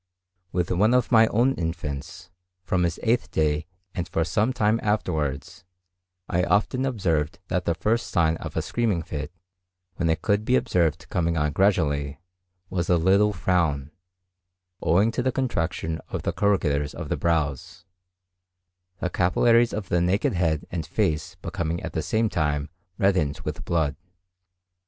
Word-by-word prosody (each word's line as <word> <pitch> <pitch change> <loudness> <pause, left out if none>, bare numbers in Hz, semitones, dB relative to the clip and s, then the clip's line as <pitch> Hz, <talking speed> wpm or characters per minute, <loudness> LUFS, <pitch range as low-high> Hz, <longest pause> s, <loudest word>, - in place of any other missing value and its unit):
With 90 -1 -1
one 105 +7 +3
of 125 - +1
my 115 -1 +7
own 120 +6 +2
infants, 80 - -5 0.3
from 90 -1 0
his 85 -1 -2
eighth 120 +1 +1
day 75 0 0 0.3
and 90 - -3
for 80 - +1
some 105 +8 +1
time 110 -3 +2
afterwards, 80 -12 -2 0.6
I 90 +1 +1
often 125 +7 +1
observed 85 - 0
that 90 0 -1
the 85 - +1
first 115 +6 0
sign 80 -2 +2
of - - -7
a - - 0
screaming 110 -8 0
fit, 75 -1 -5 0.7
when 85 -2 0
it 80 0 0
could 105 0 +2
be 125 +4 +2
observed 80 -9 +1
coming 85 -2 0
on 75 -1 +1
gradually, 75 -6 +1 0.5
was 85 -2 -2
a 90 - +5
little 100 +5 +4
frown, 80 -8 0 0.9
owing 100 +7 +3
to 125 - -1
the 130 +1 +1
contraction 85 -10 -2
of - - -4
the - - -1
corrugators 75 -8 +1
of - - -6
the - - +1
brows; 80 0 -1 1.2
the 90 - 0
capillaries 115 +6 +3
of 105 -4 -5
the 85 - +2
naked 90 +5 +1
head 80 -4 0
and 85 -2 -2
face 75 -1 -1
becoming 85 0 -2
at - - -5
the 80 - -1
same 110 +8 +1
time 75 -5 -1 0.3
reddened 80 -7 +1
with - - -5
blood. 80 -5 0
85 Hz, 155 wpm, -25 LUFS, 80-105 Hz, 1.2 s, my